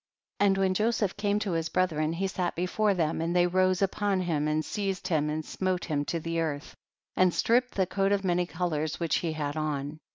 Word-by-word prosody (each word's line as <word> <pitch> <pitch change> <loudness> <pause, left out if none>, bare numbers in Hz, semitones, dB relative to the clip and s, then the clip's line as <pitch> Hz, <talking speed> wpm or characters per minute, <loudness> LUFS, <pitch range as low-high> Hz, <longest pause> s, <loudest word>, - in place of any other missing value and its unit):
27. 205 - +5
And 195 - +2
when 190 -1 +2
Joseph 215 -1 0
came 205 0 0
to 210 -2 -2
his 165 -1 -1
brethren 160 -3 +1
he 185 +4 -1
sat 185 -2 -2
before 195 +4 +1
them, 160 -2 0
and 170 +2 -1
they 175 0 +5
rose 185 +1 +2
upon 195 0 0
him 155 -4 0
and 155 0 0
seized 195 -1 -3
him 150 -3 +1
and 155 0 -3
smote 185 -2 -2
him 145 -3 -1
to 170 - -2
the 165 +1 -2
earth, 150 -3 -3 0.4
and 185 -1 +4
stripped 245 +7 +1
the 190 - +2
coat 195 +2 0
of 200 -1 +1
many 175 -1 +1
colors 160 -4 -2
which 170 -2 +1
he 165 -2 -2
had 145 -1 -3
on. 150 -1 -3
175 Hz, 220 wpm, -28 LUFS, 155-195 Hz, 0.4 s, 27